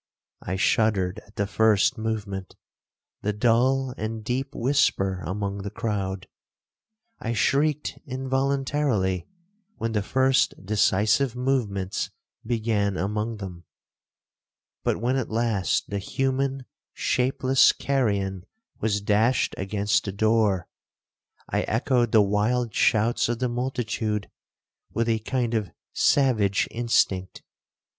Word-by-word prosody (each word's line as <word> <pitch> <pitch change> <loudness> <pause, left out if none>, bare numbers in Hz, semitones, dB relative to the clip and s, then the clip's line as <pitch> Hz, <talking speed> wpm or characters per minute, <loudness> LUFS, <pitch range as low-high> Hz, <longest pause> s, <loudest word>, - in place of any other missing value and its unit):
I 90 - -3
shuddered 100 -2 +1
at 100 - -22
the 100 - 0
first 110 +3 +3
movement—the 105 -1 -6
dull 125 +4 +2
and 110 0 -4
deep 130 +4 -3
whisper 95 -8 +1
among 100 +2 -3
the 100 - -4
crowd. 95 -3 -3 0.9
I 115 - -2
shrieked 145 +7 +1
involuntarily 135 - 0 0.5
when 115 - -3
the 105 -2 0
first 130 +5 +2
decisive 110 +5 +2
movements 115 -8 -1 0.3
began 110 -4 0
among 105 +3 -2
them; 90 -4 -8 1.2
but - - 0
when 125 +4 +1
at 130 - -2
last 110 -5 0
the 100 - -1
human 135 +4 -1 0.3
shapeless 130 +1 +3
carrion 100 -8 -1 0.3
was 105 -2 0
dashed 110 +5 +2
against 100 +2 0
the 100 - -2
door, 105 -2 +2 0.8
I - - 0
echoed 120 0 +1
the 110 -2 +6
wild 110 +4 0
shouts 115 +2 +2
of 120 - 0
the 125 +1 -1
multitude 120 -4 -2 0.6
with 115 +1 -1
a 115 -1 +1
kind 120 +1 -1
of 105 -5 -1 0.2
savage 110 -8 +3
instinct. 100 -5 0
110 Hz, 110 wpm, -25 LUFS, 100-125 Hz, 1.2 s, the